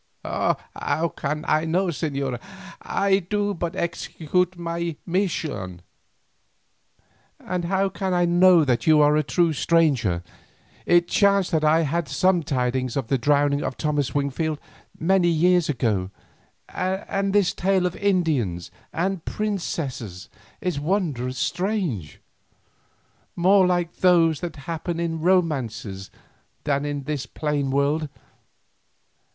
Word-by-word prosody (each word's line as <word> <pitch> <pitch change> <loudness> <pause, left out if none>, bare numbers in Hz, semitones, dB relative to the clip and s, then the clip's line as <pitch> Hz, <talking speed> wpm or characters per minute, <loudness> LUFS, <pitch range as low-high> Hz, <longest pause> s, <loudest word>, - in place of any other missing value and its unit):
"How 165 +1 -2
can 150 +2 -3
I 155 +1 +2
know, 180 +3 +1
señora? 140 -6 -3 0.4
I 195 -1 +1
do 205 +2 -1
but 170 -2 -4
execute 175 +1 -1
my 170 -1 -3
mission." 155 - -2 1.6
"And 180 -1 -3
how 195 +2 +1
can 190 -1 -3
I 175 -1 +2
know 175 -1 +5
that 120 -1 0
you 155 -1 +6
are 150 0 +5
a 155 - +3
true 170 +3 +1
messenger. 140 - +1 0.6
It 175 0 +4
chanced 200 -1 +3
that 160 -2 +1
I 155 +2 +4
had 165 0 -1
sure 185 -2 +2
tidings 130 -3 -1
of 130 -5 -3
the 135 - +1
drowning 145 +2 +2
of 130 - -4
Thomas 145 -4 -1
Wingfield 145 +2 -1 0.4
many 180 +1 +3
years 175 0 +3
ago, 105 -9 0 0.6
and 195 +1 -2
this 200 -2 +3
tale 190 -1 +1
of 180 - -1
Indians 155 - 0 0.2
and 185 0 -2
princesses 145 - -4 0.3
is 180 -5 -1
wondrous 145 -7 -1
strange, 175 - -2 1.2
more 185 +2 +4
like 175 -1 -1
those 165 -4 +4
that 170 -3 -5
happen 170 +1 -3
in 165 -1 -2
romances 125 - 0 0.5
than 140 -1 0
in 145 -1 -3
this 140 -2 -3
plain 145 0 -2
world. 140 +3 +1
165 Hz, 125 wpm, -24 LUFS, 140-180 Hz, 1.6 s, you